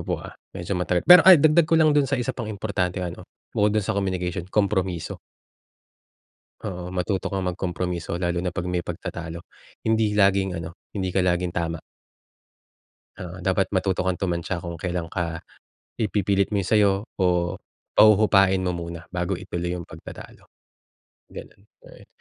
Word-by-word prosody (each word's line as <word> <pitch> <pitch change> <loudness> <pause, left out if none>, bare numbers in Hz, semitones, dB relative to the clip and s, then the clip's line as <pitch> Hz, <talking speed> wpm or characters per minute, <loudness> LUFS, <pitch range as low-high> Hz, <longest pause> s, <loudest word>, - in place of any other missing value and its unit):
po, - - -2
ah, - - -9 0.2
medyo 85 +3 -4
matagal 90 -1 0
pero, 180 0 +10
ay 185 - +11
dagdag 155 +2 +4
ko 165 - +4
lang 155 -2 +5
dun 145 -2 +2
sa 135 - +1
isa 125 +1 -2
pang 115 -3 -6
importanteng 95 -3 -2
ano, - - -12 0.2
bukod 105 +1 +2
dun 105 - +1
sa 110 - -1
communication, 95 -2 -2
kompromiso. 95 -5 -1 1.4
Oo, 90 -3 -6
matuto 95 +1 -2
kang 95 -2 -2
mag 90 - -3
kompromiso 90 -1 -3
lalo 85 -1 -1
na 90 - -1
pag 90 +1 -4
may 90 -1 -2
pagtatalo. 85 -1 -6 0.5
Hindi 110 -1 +2
laging 95 -3 +2
ano, 85 +1 -8 0.2
hindi 95 -2 -2
ka 90 0 +1
laging 90 -1 0
tama. 85 -1 -2 1.4
Oo, 90 0 -8
dapat 95 0 +1
matuto 95 0 0
kang 95 -1 0
tumantya 90 -1 -2
kung 85 -1 -7
kelan 90 -2 -2
ka, 85 -2 -3 0.6
ipipilit 100 -1 +1
mo 105 - 0
'yung 95 - -2
sa'yo 105 -2 +5 0.3
o - - +3 0.7
pahuhupain 100 -3 +5
mo 90 -1 -1
muna 85 -1 -7
bago 90 0 -1
ituloy 90 -2 -4
'yung 90 -1 -5
pagtatalo. - - -12 0.8
Gano'n, 100 - -11 0.3
ayun. - - -16
95 Hz, 160 wpm, -24 LUFS, 90-100 Hz, 1.4 s, ay